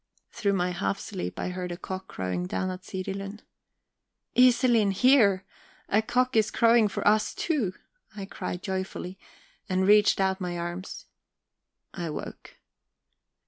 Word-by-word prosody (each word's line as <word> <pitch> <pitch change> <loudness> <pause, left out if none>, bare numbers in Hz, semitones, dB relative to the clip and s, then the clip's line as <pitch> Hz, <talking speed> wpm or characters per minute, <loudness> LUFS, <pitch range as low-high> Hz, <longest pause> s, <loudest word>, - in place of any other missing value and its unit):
Through 200 -2 0
my 180 -1 0
helf 190 +2 -1
sleep 195 -5 -5
I - - -2
heard 180 0 -4
a 175 - -5
cock 185 +1 -6
crowing 90 -1 -3
down 185 - -2
at 185 0 -7
Sirilund. 195 +2 -5 0.9
"Iselin, 240 -5 +5
hear! 205 -5 +4 0.4
A 215 - +3
cock 250 +2 0
is 220 -1 +4
crowing 230 -1 +4
for 200 - -2
us 215 +1 +3
too!" 250 - -1 0.4
I 200 -2 -5
cried 180 -2 -6
joyfully, 190 -1 -4 0.5
and 185 0 +1
reached 210 +1 +5
out 190 0 +1
my 175 -1 -3
arms. 175 +2 -6 0.9
I 170 -3 -4
woke. 150 - -8
195 Hz, 140 wpm, -27 LUFS, 185-215 Hz, 0.9 s, Iselin